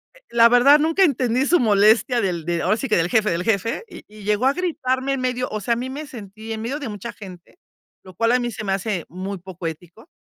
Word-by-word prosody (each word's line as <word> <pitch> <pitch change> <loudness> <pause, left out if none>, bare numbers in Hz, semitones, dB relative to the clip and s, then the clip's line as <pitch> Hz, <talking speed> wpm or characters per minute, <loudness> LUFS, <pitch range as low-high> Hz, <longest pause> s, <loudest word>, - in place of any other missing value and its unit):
eh, - - -18
la 235 0 +5
verdad 270 +5 +6
nunca 325 +5 +2
entendí 255 -5 +1
su 350 +5 +3
molestia 220 +2 +3
del 175 -5 -2
de, 170 0 -1
ahora 210 +4 +1
sí 270 - -3
que 215 - +2
del 170 +1 +1
jefe, 215 -1 +2
del 170 +1 -1
jefe, 225 - -1
y - - -12
y 210 0 -14
llegó 210 +4 0
a 270 - +4
gritarme 275 -6 -1
en 270 - -3
medio 250 0 -1
o 215 - -4
sea, 235 - 0
a - - -1
mí 250 +2 -4
me 290 +4 -6
sentí 220 -2 -10
en 220 - -5
medio 265 +6 -3
de 280 -6 -5
mucha 210 +3 -6
gente, 185 - -13 0.5
lo 185 - -12
cual, 230 +4 +2
a 250 - +3
mí 240 -1 -2
se 215 - -7
me 195 -2 -1
hace 195 -2 -2
muy 190 +3 -5
poco 180 -1 -10
ético, 175 - -10
225 Hz, 260 wpm, -22 LUFS, 195-255 Hz, 0.5 s, verdad